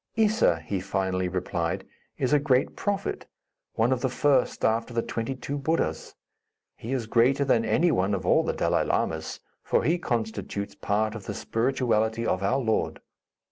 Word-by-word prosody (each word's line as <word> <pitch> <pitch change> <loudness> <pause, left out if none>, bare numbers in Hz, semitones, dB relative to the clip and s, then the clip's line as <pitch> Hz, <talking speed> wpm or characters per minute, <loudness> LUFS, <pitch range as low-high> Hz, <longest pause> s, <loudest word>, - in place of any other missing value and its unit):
"Issa," 215 - +3
he 100 +2 -2
finally 95 -1 -1
replied, 90 -2 -2 0.3
"is 130 +2 0
a 150 - +6
great 135 -3 +1
prophet, 200 -1 -2 0.5
one 115 +3 +2
of 125 - -2
the 130 - +1
first 135 0 +2
after 115 +2 0
the 115 - +1
twenty 115 +3 -3
two 140 +2 -4
Buddhas. 160 +4 -1 0.6
He 115 - -7
is 130 -4 -1
greater 125 +5 +3
than 120 -4 +3
any 160 +11 +2
one 100 -4 +1
of 95 -2 -5
all - - +4
the - - -1
Dalai - - +1
Lamas, - - -2 0.2
for - - +1
he 170 +3 +2
constitutes 110 -6 -3
part 110 +1 -1
of 110 -4 -8
the - - -4
spirituality 115 -2 0
of 90 - 0
our 100 +7 +1
Lord. 115 -5 0
115 Hz, 170 wpm, -26 LUFS, 105-135 Hz, 0.6 s, a